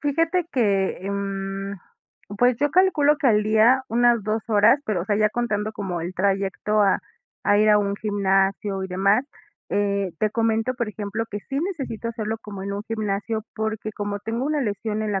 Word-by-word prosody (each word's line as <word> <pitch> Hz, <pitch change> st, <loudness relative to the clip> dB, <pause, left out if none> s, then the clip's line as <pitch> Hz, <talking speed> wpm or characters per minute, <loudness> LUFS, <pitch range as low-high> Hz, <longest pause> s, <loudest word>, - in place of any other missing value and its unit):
Fíjate 330 Hz, +5 st, +1 dB
que, 200 Hz, -6 st, +1 dB
em, 195 Hz, 0 st, -4 dB, 0.6 s
pues 245 Hz, -1 st, +4 dB
yo 290 Hz, 0 st, +1 dB
calculo 300 Hz, -5 st, +4 dB
que 280 Hz, -, +1 dB
al 210 Hz, -3 st, +4 dB
día 220 Hz, +5 st, +4 dB
unas 240 Hz, -1 st, +3 dB
2 215 Hz, +2 st, -1 dB
horas, 225 Hz, +6 st, +5 dB
pero, 190 Hz, -6 st, -1 dB
o -, -, -6 dB
sea, 205 Hz, 0 st, 0 dB
ya 215 Hz, 0 st, +3 dB
contando 215 Hz, -3 st, -1 dB
como 190 Hz, -5 st, -4 dB
el 175 Hz, +3 st, -5 dB
trayecto 200 Hz, +2 st, +1 dB
a 195 Hz, -, +3 dB, 0.5 s
a 205 Hz, -, +5 dB
ir 215 Hz, 0 st, +4 dB
a 210 Hz, -, +6 dB
un 200 Hz, -1 st, 0 dB
gimnasio 195 Hz, -1 st, 0 dB
y 190 Hz, -, -4 dB
demás, 195 Hz, +5 st, +2 dB, 0.5 s
eh, 200 Hz, -3 st, 0 dB
te 215 Hz, -1 st, +1 dB
comento, 225 Hz, +1 st, +1 dB
por 235 Hz, -3 st, -2 dB
ejemplo, 210 Hz, +2 st, -4 dB
que 205 Hz, 0 st, -4 dB
sí 275 Hz, +5 st, -4 dB
necesito 270 Hz, -, -4 dB
hacerlo 220 Hz, -1 st, -3 dB
como 200 Hz, -3 st, -8 dB
en 200 Hz, -, -4 dB
un 200 Hz, +1 st, -4 dB
gimnasio, 215 Hz, 0 st, -2 dB
porque 220 Hz, 0 st, -3 dB
como 205 Hz, 0 st, -3 dB
tengo 230 Hz, +5 st, -3 dB
una 300 Hz, -2 st, 0 dB
lesión 215 Hz, 0 st, -2 dB
en 210 Hz, -1 st, -2 dB
la 195 Hz, -, 0 dB
215 Hz, 190 wpm, -23 LUFS, 200-230 Hz, 0.6 s, a